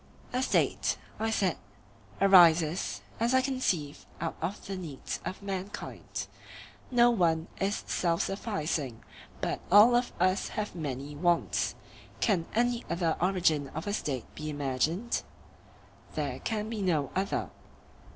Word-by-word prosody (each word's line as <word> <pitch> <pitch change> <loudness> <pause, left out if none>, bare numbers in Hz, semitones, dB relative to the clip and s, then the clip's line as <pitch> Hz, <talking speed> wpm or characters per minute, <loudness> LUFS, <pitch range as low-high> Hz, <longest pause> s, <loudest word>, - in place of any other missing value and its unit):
A 250 - +1
State, - - +1 0.2
I 225 +1 0
said, 195 -5 +1 0.6
arises, 175 -3 +5 0.2
as 235 +3 +2
I 260 - +5
conceive, 195 - -1
out 165 - -2
of 180 +5 -3
the 195 - -4
needs 160 -8 -5
of 195 - -5
mankind; 195 +1 -5 0.6
no 240 -1 +5
one 165 -6 +2
is 200 +2 0
self 170 -2 +1
sufficing, 155 - -2 0.4
but - - -1
all 215 +5 +8
of 245 +1 +1
us 185 +2 +2
have 210 -1 -2
many 145 -3 -5
wants. 175 +2 +1 0.4
Can 185 -7 +1
any 240 +1 +2
other 170 -2 +1
origin 170 -6 +2
of 160 - -4
a 205 - -2
State 135 - -2
be 155 0 -5
imagined? 150 - 0 0.9
There - - -2
can 215 -2 -2
be 220 -2 -4
no 160 -7 +1
other. 195 +2 -1
185 Hz, 130 wpm, -30 LUFS, 160-210 Hz, 0.9 s, all